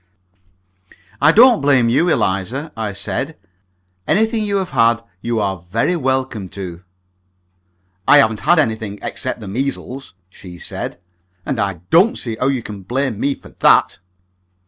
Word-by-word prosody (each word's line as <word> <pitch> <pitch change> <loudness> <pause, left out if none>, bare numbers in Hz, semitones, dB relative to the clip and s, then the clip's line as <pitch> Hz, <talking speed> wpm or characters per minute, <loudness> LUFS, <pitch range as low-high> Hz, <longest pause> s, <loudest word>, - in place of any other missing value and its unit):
"I 150 +2 +6
don't 235 +3 +6
blame 135 -4 +3
you, 140 +9 +2
Eliza," 120 - -1
I 110 -2 -3
said. 125 +9 -4 0.7
"Anything 220 +2 +2
you 205 -1 -1
have 190 -2 -3
had 115 0 +3 0.2
you 115 -1 -1
are 95 -3 -1
very 110 - -1
welcome 130 - -2
to." 90 -3 -6 1.3
"I 145 - +8
haven't 110 -6 +3
had 175 +13 +3
anything, 110 -7 0
except 130 -2 -4
the 105 - -8
measles," 130 +1 -4
she 90 -1 -12
said; 85 - -6 0.5
"and 130 - -2
I 100 -5 -2
don't 190 +8 +5
see 115 -3 -4
how 130 - -1
you 135 -4 0
can 105 -2 -8
blame 125 +2 -2
me 140 +2 0
for - - -16
that." - - +4
120 Hz, 145 wpm, -18 LUFS, 100-145 Hz, 1.3 s, I